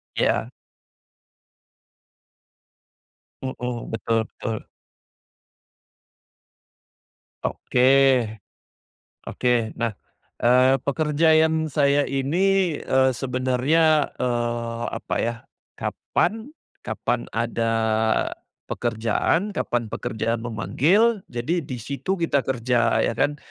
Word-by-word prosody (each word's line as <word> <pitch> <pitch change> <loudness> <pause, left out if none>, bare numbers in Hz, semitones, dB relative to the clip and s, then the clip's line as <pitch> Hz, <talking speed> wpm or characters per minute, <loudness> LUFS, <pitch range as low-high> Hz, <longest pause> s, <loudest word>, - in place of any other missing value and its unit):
Iya. - - +1 2.9
Hmm, 125 -2 -4
betul 115 0 0
betul. 110 -3 -4 2.8
Oke, 125 - -1 1.5
oke 125 -1 0 0.2
nah, 115 -1 -1 0.5
eee, 130 +2 +5
pekerjaan 160 +2 +2
saya 145 -1 +2
ini, 170 +5 +1
eee, 130 0 +3
sebenarnya, 135 +5 +2
eee, 120 -1 -2
apa - - -4
ya, 115 +1 -1 0.4
kapan 225 +3 -2 0.4
kapan 120 0 -2
ada, 115 0 0 0.9
pekerjaan, 120 - 0
kapan 120 - -2
pekerjaan 115 +1 -2
memanggil, 150 - +2
jadi 125 +9 -1
di 135 -5 -6
situ 140 - -3
kita 165 -5 +1
kerja 125 -2 +1
ya - - +1
kan. 145 +5 0
130 Hz, 75 wpm, -23 LUFS, 120-155 Hz, 2.9 s, eee